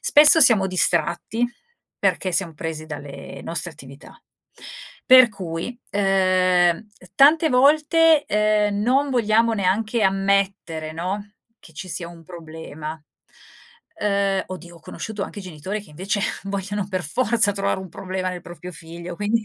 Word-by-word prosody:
Spesso 300 +2 +7
siamo 215 -9 +6
distratti, 180 +4 +2 0.5
perché 185 - 0
siam 170 -2 0
presi 155 0 -6
dalle 145 -2 -9
nostre 170 +1 -2
attività. 140 -2 -14 0.9
Per 255 -2 +8
cui, 190 +2 -6
ehm, 185 -3 +2
uhm, 215 - -15 0.3
tante 310 +4 +5
volte, 300 +4 +4
ehm, 210 -1 +1
non 270 +5 +1
vogliamo 230 -2 +2
neanche 215 +3 0
ammettere 195 -5 0
no, 195 +5 -5 0.3
che 160 - -17
ci 170 +5 -8
sia 170 -1 -5
un 170 -1 -14
problema, 160 -2 -9 1.1
uhm 200 -2 0
oddio 175 -2 -10
ho 165 - -17
conosciuto 215 +3 -6
anche 205 - -7
genitori 185 +4 -6
che 200 - -17
invece 190 +7 -2 0.2
vogliono 195 0 -4
per 185 -2 -3
forza 220 - +2
trovare 195 -1 -2
un 190 - -9
problema 185 +1 -4
nel 180 - -7
proprio 180 +1 -10
figlio, 170 +2 -9
quindi 215 +3 -1
195 Hz, 135 wpm, -22 LUFS, 170-215 Hz, 1.1 s, Per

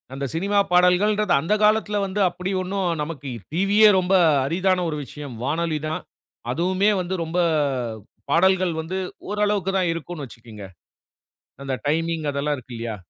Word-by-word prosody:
அந்த 140 +1 -4
சினிமா 200 +5 +1
பாடல்கள்ன்றது, 185 +4 +3
அந்த 165 +8 0
காலத்துல 210 -1 +2
வந்து 195 +1 -4
அப்டி 180 +2 -5
ஒன்னும் 190 0 -2
நமக்கு 150 -2 -5 0.2
டிவியே 200 +5 +5
ரொம்ப 185 +1 0 0.3
அரிதான 185 +4 +1
ஒரு 150 - -3
விஷயம். 145 -3 -9
வானொலி 155 +3 -1
தான் 155 - -3 0.5
அதுவுமே 185 +8 +1
வந்து 180 +1 -4
ரொம்ப 165 +2 -4 0.9
பாடல்கள் 185 +2 +3
வந்து 170 +4 -5 0.3
ஓரளவுக்கு 205 -2 0
தான் 180 -2 +1
இருக்கும்னு 165 -2 -6
வச்சுக்கோங்க. 115 -3 -12 1.0
அந்த 135 -1 -3
டைமிங் 165 +1 0
அதெல்லாம் 145 +1 -1
இருக்கு 130 -1 -11
இல்லயா. 115 -1 -4
175 Hz, 135 wpm, -23 LUFS, 150-190 Hz, 1.0 s, டிவியே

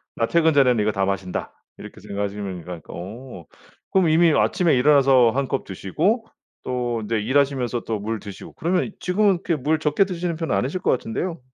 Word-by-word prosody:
나 115 - +1
퇴근 160 +1 +3
전에는 125 -5 +4
이거 105 +1 +1
다 100 -1 0
마신다.' 95 -2 -3 0.2
이렇게 - - -11
생각하시면 100 -2 -4
이건 90 -1 -8
어 100 +1 -9 0.5
그럼 185 -4 +3
이미 165 +1 +5
아침에 170 -1 +2
일어나서 135 -2 +5
1 135 +2 -1
컵 135 - -2
드시고 165 - -1 0.4
또 120 -2 -2
인제 110 +1 -1
일하시면서 130 0 0
또 110 -2 -2
물 110 +2 -3
드시고 100 -1 -10
그러면 180 +5 -1
지금은 190 -1 +1
그렇게 170 - 0
물 155 +3 +1
적게 155 +5 +2
드시는 175 -3 -3
편은 165 0 -2
아니실 150 +9 -1
것 - - +2
같은데요. 160 +9 -3
130 Hz, 395 characters per minute, -22 LUFS, 105-165 Hz, 0.5 s, 이미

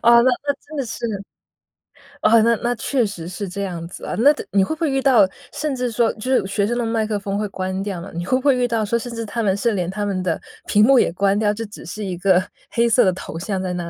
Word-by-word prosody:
哦， 235 0 +7
那 260 - +4 0.2
那 285 - +2
真 310 +1 -11
的 275 - -1
是 235 +1 -4 1.2
哦， 230 0 +6
那 230 +1 +4
那 240 +1 +1
确 245 +1 0
实 175 -5 -6
是 185 +3 -5
这 200 +2 -4
样 175 -4 -4
子 180 - -9
啊。 - - -3
那 280 +6 +7
的 - - -7
你 195 -1 +4
会 315 - -2
不 315 - -25
会 315 - +2
遇 270 0 +1
到， 240 -8 +5 0.3
甚 300 -2 -2
至 250 -1 -2
说 230 0 +2
就 255 +4 -4
是 250 - +3
学 200 +1 0
生 240 +1 -1
的 240 - 0
麦 225 -1 0
克 215 -1 -1
风 200 0 -3
会 210 - -1
关 190 0 -3
掉 195 -4 -4
嘛， 185 - -8
你 170 +1 -4
会 255 +7 +2
不 - - -8
会 275 -3 +4
遇 245 -1 +1
到 225 -2 0
说， 235 +3 +1
甚 240 +1 -6
至 230 0 -4
他 230 +2 -3
们 195 -2 +2
是 235 +2 +1
连 180 -3 -1
他 205 +2 -3
们 190 -2 -1
的 170 -3 -1 0.3
屏 210 +1 +4
幕 265 +1 +6
也 - - +2
关 195 +2 +2
掉， 210 -1 +2
就 225 +1 -5
只 205 - -11
是 195 +6 -6
一 180 -2 -4
个 185 0 +3 0.3
黑 235 0 +2
色 245 +2 +5
的 185 - +4
头 170 -2 -7
像 190 +1 -3
在 185 -1 -2
那 175 -1 -4
215 Hz, 310 characters per minute, -21 LUFS, 190-240 Hz, 1.2 s, 哦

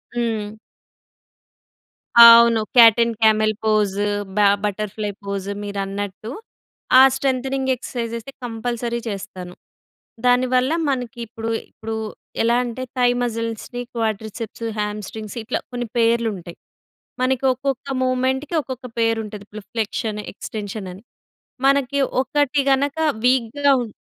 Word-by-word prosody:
హ్మ్. 220 -3 -2 1.7
అవును. 235 -1 +9 0.2
Cat 230 -2 +8
and 230 0 -2
camel 215 0 +4
పోస్, 215 -3 +2 0.4
బ - - +1 0.3
బట్టర్‌ఫ్లై 210 +1 -2
పోస్ 200 -1 -4
మీరన్నట్టు. 200 +1 -4 0.7
ఆ - - +10
స్ట్రెంథెనింగ్ 265 0 -1
ఎక్సర్సైజెస్‌ 235 -2 -5
అయితే - - -24
కంపల్సరీ 235 0 -3
చేస్తాను. 190 -3 -7 0.7
దానివల్ల 255 +2 +3 0.2
మనకి 245 -3 -3
ఇప్పుడు, 225 0 -5 0.2
ఇప్పుడు 220 0 -6 0.5
ఎలా 235 +1 +3
అంటే 245 +1 -5 0.2
థై 245 -1 +4
మజిల్స్‌, 230 -2 -3
రీ 245 - -2
క్వాడ్రిసే‌ప్స్, 220 0 -4
హ్యామ్ 210 0 -2
స్ట్రింగ్స్ 215 0 -8
ఇట్లా 235 +3 -2
కొన్ని 245 -1 -4
పేర్లు 230 0 +2
ఉంటాయి. 170 -1 -11 0.6
మనకి 260 0 +1
ఒక్కొక్క 265 0 -3
మూవ్మెంట్‌కి 260 +5 0
ఒక్కొక్క 255 -1 -7
పేరుంటది. 220 -2 -1
ప్రిఫ్లెక్షన్, 215 0 -3
ఎక్స్టెన్షన్ 205 -1 -6
అని, 190 +3 -12 0.6
మనకి 280 0 +2 0.2
ఒకటి 285 +1 +1
గనక 280 +3 0 0.3
వీక్‍గా 260 +3 +3
ఉం - - -8
230 Hz, 110 wpm, -21 LUFS, 215-255 Hz, 1.7 s, ఆ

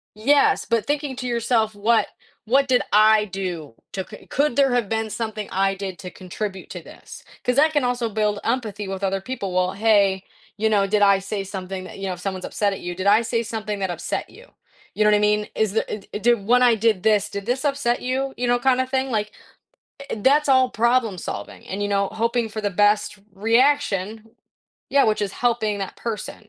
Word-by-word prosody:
Yes, 280 +7 +3
but 230 -2 0
thinking 290 -2 -2
to 250 - -4
yourself, 235 -2 0
"What 220 +3 +2 0.4
what 275 +4 +3
did 255 -1 +3
I 215 0 +5
do 180 - -5 0.2
to" 190 -1 -3 0.3
"Could 285 -2 +1
there 275 -2 +3
have 235 -5 +1
been 220 0 -2
something 220 -2 -4
I 195 +1 +1
did 190 -2 -6
to 180 - -8
contribute 190 +1 -6
to - - -6
this," - - -13 0.2
'cause 250 0 +1
that 310 +2 +4
can 290 - +2
also 245 -1 0
build 210 -1 0
empathy 220 -4 -2
with 195 0 -5
other 195 0 0
people, 200 -4 -5
well, 185 0 +1
"Hey, 200 -3 +3 0.3
you 220 +1 +1
know, 200 -2 +3
did 210 +1 +1
I 200 -1 +6
say 200 +1 -4
something 190 -1 -6
that" - - -10
you 195 - -4
know, 185 - -2
if 175 - -10
someone's 190 -1 -4
upset 205 -1 0
at - - -6
you, 175 - -4
"Did 190 +2 -3
I 210 +3 +6
say 230 0 -1
something 215 -2 -4
that 190 -1 -1
upset 175 0 -4
you?" - - -16 0.5
You 215 - +1
know 210 - +5
what 210 - +5
I - - 0
mean? 210 0 +2
Is 215 -2 0
there - - +1
it 210 0 -6
d 240 - +5
"When 235 +4 +2
I 245 -2 +5
did 220 -3 +1
this, 210 -2 +2
did 200 0 -5
this 260 +4 -1
upset 275 -4 0
you?" 265 +2 -1
you 245 - -1
know, 245 0 +2
kinda, 260 0 +2
thing, 265 0 -1
like, 210 -2 -1 0.8
e - - -1
that's 280 +8 +3
all 260 -1 +5
problem 235 -3 +1
solving, 100 - -7
and, 195 +2 -4
you 205 - -2
know, 200 -1 +1
hoping 230 +1 0
for 215 0 -5
the 205 - 0
best 205 +1 +2 0.2
reaction 225 -1 +1 0.6
Yeah, 280 0 +5
which 215 -1 +1
is 200 -1 -2
helping 230 -4 0
that 195 -1 -5
person, 220 -1 -6
215 Hz, 215 wpm, -22 LUFS, 200-245 Hz, 0.8 s, I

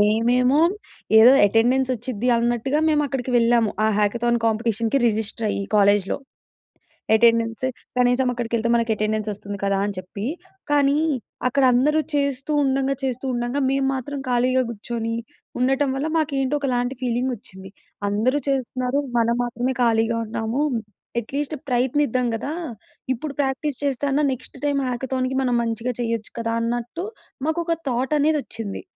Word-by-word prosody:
మేమేమో, 245 +6 +3 0.6
ఏదో 235 +4 +9
అటెండెన్స్ 245 +5 +2
వచ్చిద్ది 240 0 -3
అన్నట్టుగా, 240 +5 0
మేము 300 -1 +3
అక్కడికి 260 -1 -3
వెళ్ళాము. 230 -2 +3
ఆ - - +4
హ్యాకథాన్ 235 +3 +1
కాంపిటీషన్‌కి, 225 +2 +1
రిజిస్టర్ 220 +1 -2
అయ్యి 200 - -2
కాలేజ్‌లో. 200 -1 +3 1.0
అటెండెన్స్ 230 +1 +3 0.3
కనీసం 250 +1 +3
అక్కడికి 240 -1 -5
వెళ్తే 230 0 0
మనకు 230 -1 +1
అటెండెన్స్ 215 0 -1
వస్తుంది 205 0 -7
కదా! 200 0 +1
అని 205 -1 -3
చెప్పి. 185 +3 -7 0.5
కానీ, 285 0 +3 0.5
అక్కడ 275 +2 +1
అందరూ 295 +6 +3 0.2
చేస్తూ 280 0 -1
ఉండంగా, 270 0 +1
చేస్తూ 255 0 -2
ఉండంగా, 240 +3 -1
మేము 270 0 +1
మాత్రం 280 +2 -4
ఖాళీగా 250 +1 +2
కూర్చొని 230 +1 -4 0.4
ఉండటం 270 +2 +2
వల్ల, 275 +3 -1
మాకు 310 -2 0
ఏంటో 270 +2 0
ఒకలాంటి 250 -1 -1
ఫీలింగ్ 250 +1 0
వచ్చింది. 190 -4 -11 0.4
అందరూ 240 +8 +1
చేస్తున్నారు, 255 0 -1 0.2
మనం 235 0 +2
మాత్రమే 245 +2 -2
ఖాళీగా 230 0 +2
ఉన్నాము. 225 +4 -2 0.6
అట్‌లీస్ట్ 285 +6 -4
ప్రయత్నిద్దాం 250 0 +1
కదా! 270 +6 -4 0.6
ఇప్పుడు 285 +4 -6
ప్రాక్టీస్ 270 0 -2
చేస్తే 280 -1 0
అన్నా, 290 +2 +2
నెక్స్ట్ 260 +1 -5
టైమ్ 285 -1 +1
హ్యాకథాన్‌కి 255 +1 -2
మనం 250 -2 +1
మంచిగా 230 +2 -2
చేయొచ్చు 230 -2 -2
కదా! 230 0 -1
అన్నట్టు 240 +9 -3 0.4
మాకొక 335 +1 0
థాట్ 255 +4 0
అనేది 305 +1 +3
వచ్చింది. 210 -4 -5
245 Hz, 140 wpm, -23 LUFS, 230-270 Hz, 1.0 s, ఏదో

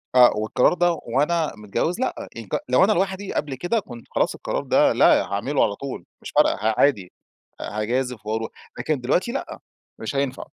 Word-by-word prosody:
آآ 125 -1 +8
والقرار 110 +8 +2
ده 175 0 +2
وأنا 155 +2 0
متجوز 105 - -2
لأ، 260 - -3
ينك 115 -4 -3
لو 125 +8 +5
أنا 205 - +4
لوحدي 190 +1 -1
قبل 145 -3 -2
كده، 175 - 0
كنت 120 - -11
خلاص - - +1
القرار - - -3
ده، - - +3
لا - - +5
هاعمله 115 +9 0
على 105 -2 0
طول، 135 -7 -7 0.2
مش - - -8
فارقة - - +4
ه 110 +1 0
عادي 105 -11 +2 0.5
هاجازف 120 +1 -2
وأروح. 110 +1 -2 0.3
لكن 150 -5 -1
دلوقتي 180 - +1
لأ، 275 - -5 0.4
مش - - -5
هينفع. 135 -1 -1
130 Hz, 175 wpm, -23 LUFS, 110-170 Hz, 0.5 s, آآ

